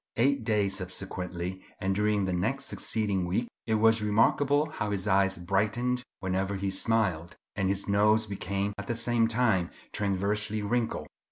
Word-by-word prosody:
Eight 140 +5 +2
days 100 -4 +1
subsequently 90 -1 -5 0.2
and 95 +1 0
during 105 0 +1
the 95 - -1
next 90 0 -1
succeeding 100 -4 -1
week, 110 +7 0 0.2
it 110 - +2
was 110 +1 +4
remarkable 140 +8 +3
how 105 -8 -3
his 100 -2 -2
eyes 95 0 +3
brightened 105 +8 0 0.2
whenever 95 +1 -1
he 95 0 -2
smiled, 95 -5 0 0.2
and 95 -2 0
his 100 0 0
nose 105 +2 +3
became 100 0 -2
at 100 - -6
the 120 - -1
same 115 0 +2
time 110 -7 +2 0.2
transversely 105 +2 0
wrinkled. 115 +2 -1
100 Hz, 155 wpm, -29 LUFS, 95-110 Hz, 0.2 s, was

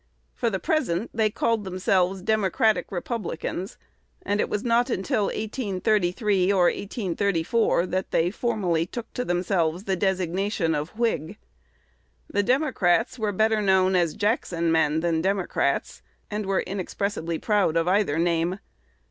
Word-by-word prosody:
For 235 - 0
the 195 - -1
present 230 - -1
they 220 -2 +2
called 225 +1 0
themselves 185 0 0
Democratic 215 +1 +1
Republicans; 190 -2 -4 0.5
and 205 +1 -1
it - - -1
was 210 - -2
not 240 +1 +2
until 215 0 0
1833 205 -3 0
or 190 -3 +3
1834, 200 0 0
that 185 +1 -2
they 170 +2 +1
formally 190 -8 0
took 230 +3 -7
to 250 - -2
themselves 175 -2 0
the 195 -2 0
designation 190 -1 0
of 150 +7 -4
Whig. 225 -10 -1 0.9
The 205 - 0
Democrats 245 - +1
were 215 -2 0
known 195 -3 +3
better - - +4
as 165 -3 -3
Jackson 180 -6 0
men 160 -1 +2
than 170 -1 +1
as - - 0
Democrats, 185 -7 -1 0.3
and 210 -1 -3
were 195 -1 +1
inexpressibly 185 -3 -3
proud 205 -6 +1
of 165 +1 +1
either 185 -5 +2
name. 170 +2 +1
190 Hz, 140 wpm, -25 LUFS, 175-215 Hz, 0.9 s, better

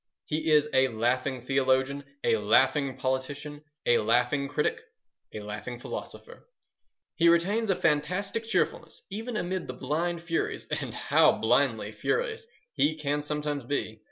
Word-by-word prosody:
He 155 +1 -1
is 150 -1 +5
a 130 0 +5
laughing 125 +2 -1
theologian, 135 +1 +1 0.2
a 115 - +3
laughing 130 +6 +3
politician, 145 +3 -3 0.2
a 120 - +4
laughing 125 +5 +2
critic, 145 +2 -1 0.5
a 105 - -6
laughing 105 +3 -6
philosopher. 480 - -8 0.6
He 170 0 +4
retains 200 +7 +2
a 190 - +3
fantastic 180 +9 0
cheerfulness 215 -6 -1
even 225 +3 -4
amid 185 0 -2
the 130 - -5
blind 170 +5 -2
furies—and 165 -1 -2
how - - +4
blindly - - +1
furious 455 -1 -2 0.3
he 155 +1 +2
can 150 -1 -1
sometimes 150 -1 -3
be! 120 -4 -3
145 Hz, 130 wpm, -28 LUFS, 130-170 Hz, 0.6 s, is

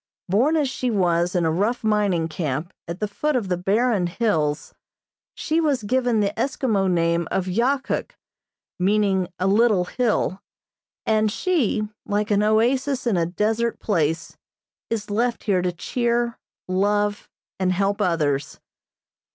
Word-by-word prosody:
Born 250 - +3
as 295 -3 +2
she 255 -1 -2
was 180 -4 +1
in 175 -2 +2
a 160 - +2
rough 210 +9 0
mining 205 -6 +1
camp 155 0 -3
at 170 +2 -5
the 210 - -1
foot 300 +8 -1
of 220 -7 -1
the 180 - +2
barren 200 +1 +1
hills, 160 -7 -1 0.6
she 320 +1 0
was 285 -7 +1
given 245 0 +1
the 200 0 0
Eskimo 220 -8 0
name 170 -1 +1
of 190 - -1
Yahkuk, 260 - -1 0.7
meaning 195 -1 +2
a 180 - -1
little 205 -2 +3
hill, 210 -3 0 0.6
and 215 -1 +2
she, 230 - 0 0.2
like 210 +1 -1
an 205 0 +3
oasis 250 +6 +1
in 235 -5 +2
a 170 -2 +1
desert 220 +6 -1
place, 165 -5 -1 0.5
is 210 -2 -3
left 235 +3 0
here 190 -4 +2
to 180 0 0
cheer, 235 +6 -1 0.3
love, 205 +2 0 0.3
and 185 -1 +1
help 195 +2 0
others. 150 -5 0
205 Hz, 145 wpm, -23 LUFS, 180-235 Hz, 0.7 s, Born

